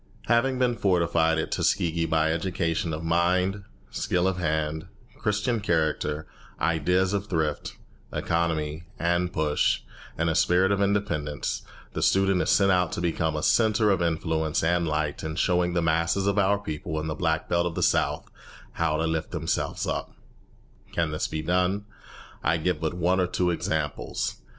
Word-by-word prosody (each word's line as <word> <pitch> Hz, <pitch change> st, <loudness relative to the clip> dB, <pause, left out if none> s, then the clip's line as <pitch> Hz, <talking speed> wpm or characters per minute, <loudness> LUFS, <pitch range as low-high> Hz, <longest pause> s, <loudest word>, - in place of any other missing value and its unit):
Having 120 Hz, +3 st, +2 dB
been 125 Hz, -1 st, +2 dB
fortified 85 Hz, -5 st, +2 dB
at 80 Hz, -, -2 dB
Tuskegee 85 Hz, -1 st, +1 dB
by 80 Hz, 0 st, +2 dB
education 85 Hz, -1 st, -1 dB
of 80 Hz, +1 st, -4 dB
mind, 90 Hz, +4 st, +1 dB, 0.3 s
skill 90 Hz, 0 st, 0 dB
of 95 Hz, -1 st, 0 dB
hand, 80 Hz, -1 st, -1 dB, 0.3 s
Christian 105 Hz, +2 st, 0 dB
character, 80 Hz, -5 st, 0 dB, 0.3 s
ideas 90 Hz, +4 st, +1 dB
of 100 Hz, 0 st, -1 dB
thrift, 80 Hz, -5 st, -2 dB, 0.3 s
economy, 80 Hz, -1 st, -1 dB
and 85 Hz, +1 st, 0 dB
push, 75 Hz, -2 st, +1 dB, 0.4 s
and 85 Hz, -, 0 dB
a 80 Hz, -, +2 dB
spirit 90 Hz, +4 st, +3 dB
of 100 Hz, 0 st, +1 dB
independence, 85 Hz, -8 st, -1 dB, 0.3 s
the -, -, -3 dB
student 95 Hz, -1 st, +3 dB
is -, -, -1 dB
sent 100 Hz, -1 st, +4 dB
out 90 Hz, -2 st, +2 dB
to -, -, -3 dB
become 80 Hz, -2 st, 0 dB
a 75 Hz, -, -3 dB
centre 110 Hz, -2 st, +3 dB
of 95 Hz, -3 st, +1 dB
influence 80 Hz, -2 st, 0 dB
and 85 Hz, +1 st, +2 dB
light 75 Hz, -1 st, -1 dB
in 80 Hz, 0 st, -4 dB
showing 90 Hz, 0 st, +1 dB
the 85 Hz, -1 st, +1 dB
masses 85 Hz, +4 st, +1 dB
of 100 Hz, 0 st, +2 dB
our 100 Hz, +1 st, +3 dB
people 80 Hz, -4 st, -4 dB
in 80 Hz, -, -4 dB
the 80 Hz, -, -2 dB
Black 80 Hz, +1 st, -1 dB
Belt 85 Hz, 0 st, +1 dB
of 85 Hz, -, -5 dB
the -, -, 0 dB
South -, -, +1 dB, 0.5 s
how 80 Hz, -2 st, 0 dB
to 80 Hz, -, 0 dB
lift 80 Hz, -1 st, -1 dB
themselves -, -, -2 dB
up. -, -, -3 dB, 0.8 s
Can 85 Hz, -2 st, 0 dB
this 75 Hz, -, -1 dB
be 80 Hz, 0 st, -4 dB
done? 90 Hz, +4 st, +1 dB, 0.6 s
I 80 Hz, +4 st, +2 dB
give 90 Hz, +3 st, -1 dB
but 80 Hz, +1 st, -1 dB
one 90 Hz, +1 st, +1 dB
or 90 Hz, -, +2 dB
two 90 Hz, 0 st, 0 dB
examples. 80 Hz, -3 st, -2 dB
85 Hz, 165 wpm, -26 LUFS, 80-95 Hz, 0.8 s, sent